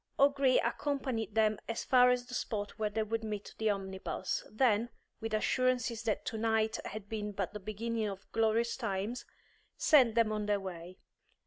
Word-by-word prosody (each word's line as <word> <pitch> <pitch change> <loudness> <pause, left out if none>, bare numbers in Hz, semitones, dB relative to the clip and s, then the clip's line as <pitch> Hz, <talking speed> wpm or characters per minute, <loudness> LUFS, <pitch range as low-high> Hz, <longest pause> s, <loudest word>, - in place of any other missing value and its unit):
O'Gree 275 -2 +4
accompanied 260 -7 -2
them 215 -1 +3
as 230 - -2
far 250 -1 +6
as 250 0 +1
the 250 - -11
spot 210 -3 -3
where 215 -1 +1
they 220 +1 -1
would 225 +1 -2
meet 210 -2 -5
the 220 -1 +2
omnibus, 190 -2 -2
then, 230 -1 +2 0.3
with 225 0 -4
assurances 245 +1 +1
that 225 -2 -1
to 225 - -3
night 220 0 +1
had 210 -1 -6
been 210 -1 -3
but 195 +1 -3
the 210 - -5
beginning 215 +2 -2
of 195 -1 -8
glorious 225 +1 +2
times, 220 0 -3 0.5
sent 255 -7 +5
them 230 -2 +3
on 210 -1 -2
their 205 -1 +2
way. 180 -1 -8
220 Hz, 175 wpm, -32 LUFS, 210-235 Hz, 0.5 s, far